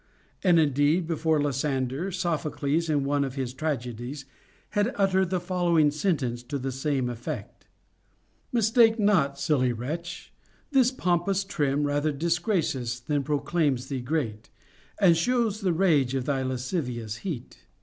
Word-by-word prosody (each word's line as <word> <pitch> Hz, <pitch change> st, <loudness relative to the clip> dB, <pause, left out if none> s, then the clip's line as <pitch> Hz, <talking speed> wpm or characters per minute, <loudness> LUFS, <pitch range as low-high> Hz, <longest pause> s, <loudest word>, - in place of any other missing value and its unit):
And 175 Hz, -3 st, +5 dB
indeed, 150 Hz, +3 st, +2 dB
before 160 Hz, -1 st, +1 dB
Lysander, 140 Hz, +3 st, -1 dB
Sophocles 165 Hz, -3 st, -1 dB
in 145 Hz, -2 st, +2 dB
one 140 Hz, +1 st, +1 dB
of 135 Hz, -1 st, -4 dB
his 130 Hz, -3 st, -3 dB
tragedies 130 Hz, -2 st, -4 dB, 0.5 s
had 210 Hz, +4 st, +1 dB
uttered 190 Hz, -2 st, +2 dB
the 185 Hz, 0 st, 0 dB
following 175 Hz, -4 st, +2 dB
sentence 145 Hz, -7 st, -1 dB
to 140 Hz, +4 st, -4 dB
the 135 Hz, 0 st, -3 dB
same 135 Hz, -1 st, -1 dB
effect: 120 Hz, -1 st, -6 dB, 0.8 s
Mistake 225 Hz, 0 st, +4 dB
not, 195 Hz, -10 st, +2 dB
silly 140 Hz, -3 st, +1 dB
wretch; 155 Hz, +9 st, -6 dB, 0.4 s
this 260 Hz, -3 st, +5 dB
pompous 185 Hz, -4 st, 0 dB
trim 145 Hz, -6 st, 0 dB
Rather 145 Hz, +1 st, +1 dB
disgraces 160 Hz, -, -1 dB
than 145 Hz, +4 st, -1 dB
proclaims 145 Hz, -2 st, 0 dB
thee 135 Hz, -3 st, -3 dB
great, 120 Hz, -6 st, -3 dB, 0.5 s
And 175 Hz, -4 st, +6 dB
shows 225 Hz, +3 st, +1 dB
the 190 Hz, -3 st, +1 dB
rage 155 Hz, -7 st, +2 dB
of 130 Hz, -2 st, -1 dB
thy 135 Hz, -2 st, 0 dB
lascivious 125 Hz, -, -3 dB
heat. 145 Hz, -8 st, -7 dB
150 Hz, 135 wpm, -27 LUFS, 130-175 Hz, 0.8 s, And